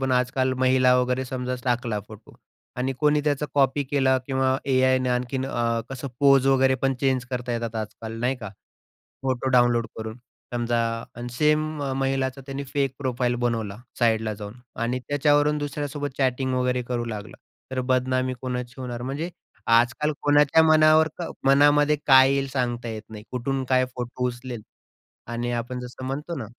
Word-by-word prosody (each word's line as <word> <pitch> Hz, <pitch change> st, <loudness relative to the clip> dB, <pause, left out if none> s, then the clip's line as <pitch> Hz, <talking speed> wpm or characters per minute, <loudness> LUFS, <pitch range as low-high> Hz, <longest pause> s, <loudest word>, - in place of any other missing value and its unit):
पण 135 Hz, -1 st, 0 dB
आजकाल 125 Hz, +1 st, +1 dB
महिला 130 Hz, 0 st, +4 dB
वगैरे 125 Hz, +1 st, 0 dB
समजा 125 Hz, 0 st, -3 dB
टाकला 120 Hz, -4 st, 0 dB
फोटो 110 Hz, 0 st, -13 dB, 0.4 s
आणि 130 Hz, +2 st, -1 dB
कोणी 150 Hz, 0 st, +3 dB
त्याचा 150 Hz, 0 st, 0 dB
कॉपी 140 Hz, 0 st, +3 dB
केला 135 Hz, -1 st, +2 dB
किंवा 130 Hz, -1 st, +1 dB
एआय 130 Hz, 0 st, +4 dB
ने 130 Hz, 0 st, -1 dB
आणखीन 125 Hz, +2 st, -1 dB
अ, 115 Hz, -2 st, 0 dB
कसं 135 Hz, +1 st, -5 dB
पोज 135 Hz, -1 st, +5 dB
वगैरे 135 Hz, -1 st, +4 dB
पण 135 Hz, 0 st, +2 dB
चेंज 130 Hz, -2 st, +1 dB
करता 125 Hz, -1 st, -3 dB
येतात 115 Hz, -1 st, -3 dB
आजकाल 110 Hz, +1 st, -6 dB
नाही 125 Hz, +2 st, 0 dB
का? 115 Hz, -4 st, -7 dB, 0.7 s
फोटो 130 Hz, 0 st, -1 dB
डाउनलोड 120 Hz, -2 st, +3 dB
करून 110 Hz, 0 st, -6 dB, 0.4 s
समजा 120 Hz, 0 st, 0 dB, 0.4 s
आणि 120 Hz, 0 st, -5 dB
सेम 150 Hz, +4 st, +3 dB, 0.4 s
महिलाचा 135 Hz, 0 st, -1 dB
त्यांनी 140 Hz, 0 st, -5 dB
फेक 140 Hz, -1 st, -1 dB
प्रोफाइल 125 Hz, -3 st, 0 dB
बनवला 110 Hz, -4 st, -2 dB, 0.2 s
साइडला 110 Hz, -2 st, +1 dB
जाऊन 105 Hz, 0 st, -8 dB, 0.3 s
आणि 120 Hz, +2 st, 0 dB
त्याच्यावरून 145 Hz, +1 st, +3 dB
दुसऱ्यासोबत 145 Hz, 0 st, -4 dB
चॅटिंग 130 Hz, -1 st, +1 dB
वगैरे 125 Hz, 0 st, 0 dB
करू 120 Hz, -1 st, -3 dB
लागला. 110 Hz, -2 st, -7 dB, 0.3 s
तर 130 Hz, -1 st, -1 dB
बदनामी 130 Hz, 0 st, +1 dB
कोणाची 125 Hz, -1 st, -4 dB
होणार. 120 Hz, -2 st, -5 dB
म्हणजे 140 Hz, +7 st, -3 dB, 0.4 s
आजकाल 120 Hz, +6 st, +3 dB
कोणाच्या 145 Hz, +2 st, +5 dB
मनावर 155 Hz, 0 st, +5 dB
क 175 Hz, -, -4 dB, 0.2 s
मनामध्ये 145 Hz, +2 st, +5 dB
काय 130 Hz, -1 st, +7 dB
येईल? 140 Hz, 0 st, 0 dB
सांगता 120 Hz, -3 st, -2 dB
येत 110 Hz, -1 st, -5 dB
नाही. 105 Hz, -1 st, -9 dB
कुठून 130 Hz, +2 st, -2 dB
काय 130 Hz, -1 st, +4 dB
फोटो 125 Hz, 0 st, -3 dB
उचलेलं 120 Hz, -2 st, -6 dB, 0.7 s
आणि 120 Hz, +1 st, -2 dB
आपण 120 Hz, +1 st, -3 dB
जसं 125 Hz, +1 st, -8 dB
म्हणतो 145 Hz, +6 st, -4 dB
ना 120 Hz, -, -4 dB
130 Hz, 160 wpm, -25 LUFS, 120-135 Hz, 0.7 s, काय